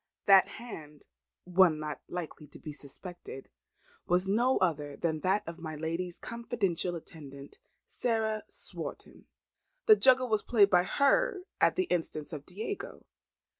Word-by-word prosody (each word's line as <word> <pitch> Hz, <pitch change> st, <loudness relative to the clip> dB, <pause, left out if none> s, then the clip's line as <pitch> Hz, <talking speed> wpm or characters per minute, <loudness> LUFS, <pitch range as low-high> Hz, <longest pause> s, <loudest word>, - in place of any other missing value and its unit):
That 195 Hz, -2 st, +7 dB
hand, 155 Hz, -11 st, -10 dB, 0.4 s
one 180 Hz, -3 st, +4 dB
not 150 Hz, -2 st, -5 dB
likely 160 Hz, -3 st, -6 dB
to 145 Hz, -, -14 dB
be 155 Hz, -, -8 dB
suspected, 145 Hz, 0 st, -7 dB, 0.6 s
was 180 Hz, +2 st, +2 dB
no 240 Hz, +6 st, +3 dB
other 150 Hz, -5 st, -1 dB
than 160 Hz, -2 st, -1 dB
that 190 Hz, +5 st, +1 dB
of 165 Hz, +1 st, -7 dB
my 160 Hz, -2 st, -6 dB
lady's 165 Hz, +3 st, -3 dB
confidential 210 Hz, -7 st, -2 dB
attendant, 140 Hz, -4 st, -10 dB, 0.3 s
Sarah 220 Hz, -2 st, -1 dB
Swarton. -, -, -7 dB, 0.6 s
The 435 Hz, -, +8 dB
juggle 260 Hz, -6 st, +6 dB
was 215 Hz, -3 st, +1 dB
played 205 Hz, -4 st, +4 dB
by 180 Hz, -1 st, +4 dB
her 370 Hz, -, +2 dB, 0.2 s
at -, -, +4 dB
the 370 Hz, -, +2 dB
instance 165 Hz, -, -3 dB
of 145 Hz, -2 st, -7 dB
Diego. 375 Hz, -, -6 dB
180 Hz, 135 wpm, -30 LUFS, 155-225 Hz, 0.6 s, The